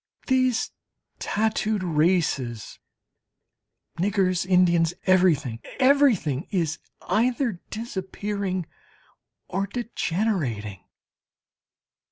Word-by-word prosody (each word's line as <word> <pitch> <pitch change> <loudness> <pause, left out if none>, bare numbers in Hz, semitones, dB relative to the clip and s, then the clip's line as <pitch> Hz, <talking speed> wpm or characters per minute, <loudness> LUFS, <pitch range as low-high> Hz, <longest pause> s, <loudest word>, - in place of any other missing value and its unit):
These 255 -2 +1 0.5
tattooed 215 -1 0
races, 150 - 0 1.2
niggers, 185 -1 +1
Indians 175 -2 +3
everything, 160 -11 +3 0.2
everything 255 - +3
is 170 -5 -1 0.3
either 235 -3 +1
disappearing 200 -3 -3 0.8
or 195 +2 -2
degenerating. 175 - -2
185 Hz, 60 wpm, -25 LUFS, 165-220 Hz, 1.2 s, Indians